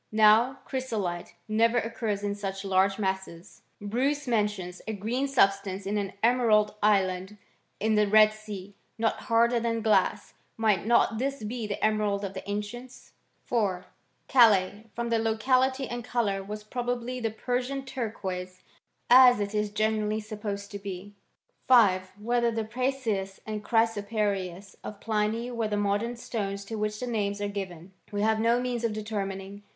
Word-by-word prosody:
Now 220 +4 +5
chrysolite 215 -10 -3
never 230 +2 +3
occurs 225 -3 -2
in 205 0 -1
such 195 -1 -5
large 195 0 +2
masses. 190 -4 -4 0.2
Bmce 265 +7 -1
mentions 205 -6 -1
a 220 - -2
green 230 +7 -1
substance 195 -6 +1
in 205 +1 0
an 200 -1 -4
emerald 225 -3 +4
island 190 -1 +1 0.4
in 220 +1 +1
the 210 -1 +3
Red 215 +1 +6
Sea, 205 -2 -9 0.2
not 225 0 0
harder 235 +1 +4
than 230 -1 -1
glass. 220 -2 +2 0.2
Might 215 -3 +1
not 230 -1 +3
this 275 -2 -2
be 225 +1 -4
the 205 - -1
emerald 210 -2 +1
of 195 - -5
the 190 - -5
ancients? 240 +5 -6 0.3
4. 195 -6 0 0.4
Calais 215 -8 +5
y 210 +2 -16
from 235 0 -2
the 230 -1 +2
locality 255 +4 +1
and 240 0 -5
colour 220 -5 0
was 210 +2 -7
pro 245 +3 -4
bably 245 +1 -3
the 225 - 0
Persian 250 +4 -3
turquoise, 190 -8 -5 0.4
as 250 -2 +8
it 205 0 -2
is 210 0 0
generally 215 0 0
sup 215 -1 -8
posed 200 -1 -4
to 200 - -6
be. 200 0 -7 0.5
5. 190 -7 +5
Whether 235 +2 +1
the 225 -1 -2
prasius 220 -5 -2
and 215 -1 -4
chrysoprasius 205 -4 -1
of 210 - -7
Pliny 220 +3 -1
were 230 -2 -1
the 210 -1 -1
modern 205 +4 0
stones 200 -4 -4
to 225 - -5
which 210 0 -2
these 250 - -4
names 205 -3 -1
are 205 - -1
given, 190 -3 -6 0.2
we 205 0 -1
have 220 0 +2
no 230 +2 +3
means 245 -1 -2
of 230 -2 0
determining. 200 -2 -5
215 Hz, 160 wpm, -28 LUFS, 200-235 Hz, 0.5 s, as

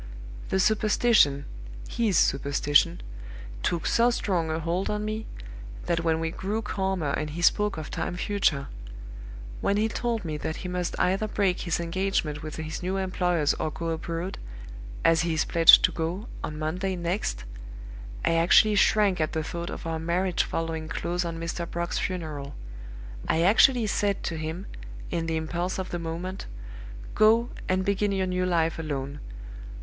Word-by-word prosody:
The 190 - +1
superstition 210 -8 +3 0.4
his 215 -7 +1
superstition 145 +4 +2 0.6
took 170 - -1
so 235 +1 +4
strong 180 -8 0
a 160 +1 -1
hold 170 +4 -1
on 210 0 -2
me, 215 +1 -4 0.6
that 170 -1 0
when 160 -1 +1
we 165 0 -2
grew 205 +5 -3
calmer 190 -7 -1
and 150 +2 -2
he 170 +4 -5
spoke 210 +2 +3
of 155 - -6
time - - -3
future 175 -8 0 0.9
when 200 - +1
he 215 +1 +2
told 230 -2 -2
me 155 -2 -3
that 160 +2 -4
he - - -1
must 180 -1 -3
either 195 +4 +1
break 195 -3 0
his 170 -2 -1
engagement 170 -3 -1
with 155 -1 -6
his 160 +2 -5
new 185 +2 -1
employers 180 -5 +1
or - - 0
go 165 +2 -4
abroad, 165 +3 -4 0.7
as 165 0 +5
he 165 -1 0
is 155 - +1
pledged 165 -1 +8
to - - +4
go, 175 +7 -3 0.2
on 150 - -4
Monday 180 +5 -2
next 170 - -2 0.8
I - - +3
actually 170 +6 +5
shrank 200 -3 +3
at 155 - -1
the 160 - -1
thought 170 +2 -5
of - - -7
our 165 -1 -2
marriage 175 +2 0
following 165 -1 -3
close 175 +2 -2
on 165 -1 -4
Mr. 170 +1 -4
Brock's 170 0 -2
funeral; 155 -6 -4 0.7
I 165 - +2
actually 230 +5 +5
said 205 -1 0
to 165 - -2
him, 160 +4 -5 0.5
in 165 -1 -1
the 160 0 0
impulse 175 +3 -2
of 190 -1 -4
the 175 - -2
moment, 170 +3 -5 0.7
'Go, 225 +3 +4 0.2
and 185 0 +1
begin 200 +1 +1
your 190 -1 0
new 180 0 -1
life 165 -2 +1
alone! 140 -2 -4
175 Hz, 165 wpm, -27 LUFS, 160-195 Hz, 0.9 s, pledged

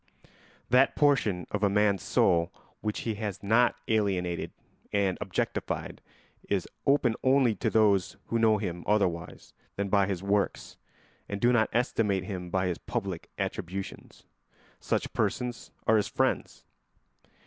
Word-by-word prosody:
That 130 +2 +5
portion 115 - +2
of 105 - -2
a 100 - +3
man's 100 -2 +2
soul 85 0 +2 0.3
which 105 0 -2
he 115 - -2
has 105 -3 -4
not 115 +5 +4
alienated 95 -5 0 0.4
and 100 -3 +1
objectified - - -3 0.5
is - - 0 0.2
open 135 -4 +4
only 130 -3 +4
to 115 - 0
those 105 -4 +2
who 115 - -1
know 110 -1 +4
him 90 -4 -4
otherwise 95 -6 -1 0.2
than 100 0 -2
by 100 -1 +3
his 95 -2 -3
works 100 0 -1 0.5
and 100 - -3
do 120 +3 +4
not 110 -2 +3
estimate 110 -5 +1
him 90 -4 -5
by 95 +1 0
his 90 -2 -2
public 100 -8 -4
attributions. 95 +2 -5 0.6
Such - - -2
persons 125 -1 -2 0.2
are 110 - +5
his 105 - +1
friends. - - -1
100 Hz, 135 wpm, -28 LUFS, 95-115 Hz, 0.6 s, That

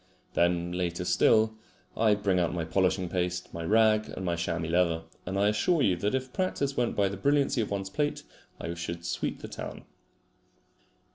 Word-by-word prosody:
Then, 85 0 +1
later 90 0 -2
still, 110 +4 +4 0.4
I 110 -2 +4
bring 100 -3 +1
out 85 0 0
my 85 -2 -2
polishing 95 +2 +1
paste, 90 0 -2
my 85 - -5
rag, 110 +3 +3
and 95 - -6
my 85 -1 0
chamois 85 0 -2
leather; 85 -1 +2 0.2
and 95 +1 -2
I 100 +1 +4
assure 145 +9 +2
you 95 - +3
that 105 +7 0
if 130 -1 -3
practice 140 -7 -1
went 120 -1 0
by 100 -1 +3
the 100 0 -4
brilliancy 140 +2 +2
of 105 - -2
one's 95 -1 -3
plate, 145 +4 -1 0.4
I 85 - -4
should 85 0 -5
sweep - - -3
the - - -4
town. - - -7
95 Hz, 185 wpm, -29 LUFS, 85-110 Hz, 0.4 s, still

